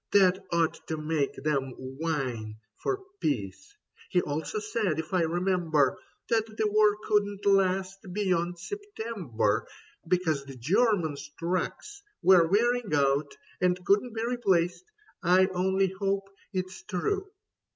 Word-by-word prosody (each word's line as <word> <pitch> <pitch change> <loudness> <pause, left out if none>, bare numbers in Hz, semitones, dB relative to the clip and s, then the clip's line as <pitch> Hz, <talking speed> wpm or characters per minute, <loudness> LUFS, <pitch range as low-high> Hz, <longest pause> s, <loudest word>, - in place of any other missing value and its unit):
That 190 -1 +5
ought 170 -2 0
to 160 - -2
make 155 -2 -1
them 135 -3 -1
whine 130 -6 -3 0.3
For 390 0 -1 0.2
peace. 140 - -3 0.3
He 180 - +3
also 150 +4 -3
said, 210 -4 -1
if 160 +3 -5
I 185 - +3
remember, 165 -4 +1 0.3
That 225 -2 +2
the 215 -1 -1
war 210 0 +4
couldn't 205 -1 0
last 195 -1 +2
beyond 175 -3 0
September, 205 - -2 0.4
Because 160 -6 +1
the 135 -1 -9
Germans' 165 - +1
trucks 185 - -3 0.2
were 180 -3 +7
wearing 235 +4 +2
out 140 +1 +1 0.2
And 180 0 +1
couldn't 210 +5 +2
be 225 +1 -1
replaced. 195 - +1 0.4
I 185 +1 +5
only 190 +1 +2
hope 195 +1 -2 0.2
It's 185 -1 -4
true. 210 - -2
185 Hz, 125 wpm, -28 LUFS, 155-205 Hz, 0.4 s, were